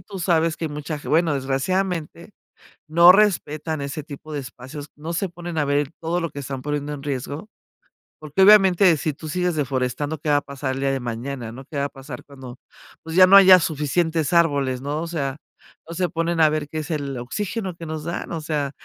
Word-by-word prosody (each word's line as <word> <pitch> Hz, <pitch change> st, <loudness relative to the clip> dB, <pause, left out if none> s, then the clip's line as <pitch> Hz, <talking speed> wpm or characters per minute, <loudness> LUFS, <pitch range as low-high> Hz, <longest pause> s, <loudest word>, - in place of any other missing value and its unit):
tú 200 Hz, -2 st, -9 dB
sabes 165 Hz, -2 st, +1 dB
que 165 Hz, -, -3 dB
hay -, -, -4 dB
mucha, 150 Hz, +1 st, -5 dB
bueno, 160 Hz, -1 st, +2 dB
desgraciadamente, 170 Hz, +7 st, -2 dB, 0.6 s
no 170 Hz, +3 st, +7 dB
respetan 160 Hz, -6 st, +1 dB
ese 140 Hz, +2 st, -4 dB
tipo 155 Hz, 0 st, -10 dB
de 145 Hz, -, -2 dB
espacios, 135 Hz, +3 st, -9 dB
no 160 Hz, +3 st, -6 dB
se 180 Hz, +3 st, -1 dB
ponen 175 Hz, -1 st, -6 dB
a 150 Hz, -, +2 dB
ver 145 Hz, 0 st, 0 dB
todo 170 Hz, +2 st, -1 dB
lo 165 Hz, -, -3 dB
que 140 Hz, -, -7 dB
están 135 Hz, -1 st, -6 dB
poniendo 145 Hz, 0 st, -3 dB
en 140 Hz, -1 st, -7 dB
riesgo, 145 Hz, -, -5 dB, 0.7 s
porque, 155 Hz, +5 st, 0 dB
obviamente, 190 Hz, -3 st, +6 dB
si 155 Hz, +1 st, -2 dB
tu 155 Hz, +2 st, -9 dB
sigues 180 Hz, +1 st, -1 dB
deforestando, 140 Hz, +1 st, -2 dB
¿qué 150 Hz, -, -6 dB
va 145 Hz, -, +5 dB
a -, -, -2 dB
pasar 140 Hz, -2 st, -4 dB
el 135 Hz, -, -5 dB
día 135 Hz, 0 st, +1 dB
de 135 Hz, -, -2 dB
mañana? 120 Hz, 0 st, -5 dB
¿no? 130 Hz, +3 st, -10 dB
¿Qué 150 Hz, +2 st, -10 dB
va 140 Hz, -, +1 dB
a -, -, -2 dB
pasar 135 Hz, -2 st, -10 dB
cuando? 130 Hz, -3 st, -11 dB, 0.4 s
Pues, 160 Hz, 0 st, -7 dB
ya 185 Hz, -, +9 dB
no 195 Hz, -, +8 dB
haya 190 Hz, -2 st, +9 dB
suficientes 160 Hz, +1 st, 0 dB
árboles, 140 Hz, -7 st, +2 dB
¿no? 145 Hz, +3 st, -2 dB
O -, -, -4 dB
sea, 140 Hz, -5 st, -3 dB, 0.5 s
no 170 Hz, -, -6 dB
se 180 Hz, 0 st, 0 dB
ponen 165 Hz, 0 st, -1 dB
a 155 Hz, -, +7 dB
ver 150 Hz, -1 st, -2 dB
qué 155 Hz, -, -5 dB
es 155 Hz, +2 st, -5 dB
el 140 Hz, -3 st, -3 dB
oxígeno 190 Hz, -, -4 dB
que 170 Hz, -, -8 dB
nos 155 Hz, -1 st, -5 dB
dan, 170 Hz, +1 st, -4 dB
o 165 Hz, -, -3 dB
sea, 150 Hz, -2 st, -2 dB
155 Hz, 215 wpm, -22 LUFS, 140-170 Hz, 0.7 s, ya